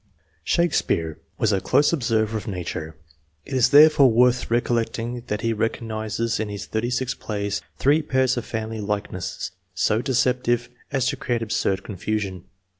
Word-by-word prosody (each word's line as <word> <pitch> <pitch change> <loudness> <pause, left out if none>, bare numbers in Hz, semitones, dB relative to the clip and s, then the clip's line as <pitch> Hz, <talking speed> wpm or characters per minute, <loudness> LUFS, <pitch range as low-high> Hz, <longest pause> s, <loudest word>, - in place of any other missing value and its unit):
Shakespeare 85 - +1 0.2
was 110 - +2
a 95 - +1
close 145 +5 +3
observer 110 -6 +1
of 105 -3 -4
nature; 85 -5 -5 0.5
it - - -8
is, 130 -1 +4
therefore, 145 -1 +7
worth 125 +2 +3
recollecting 120 0 -1
that 105 0 -2
he 115 -1 +1
recognizes 110 0 -2
in 110 -1 -2
his 100 -1 -5
thirty 110 +2 -2
six 125 0 -1
plays 100 -2 -3 0.2
three 145 +4 +3
pairs 130 -2 +1
of 120 - -3
family 110 -1 -4
likeness 100 -3 -4 0.2
so 105 +4 +2
deceptive 125 -2 +1 0.2
as 135 -3 +1
to - - -3
create 120 -3 -1
absurd 105 -3 -1
confusion. 100 -2 -3
115 Hz, 150 wpm, -23 LUFS, 105-125 Hz, 0.5 s, therefore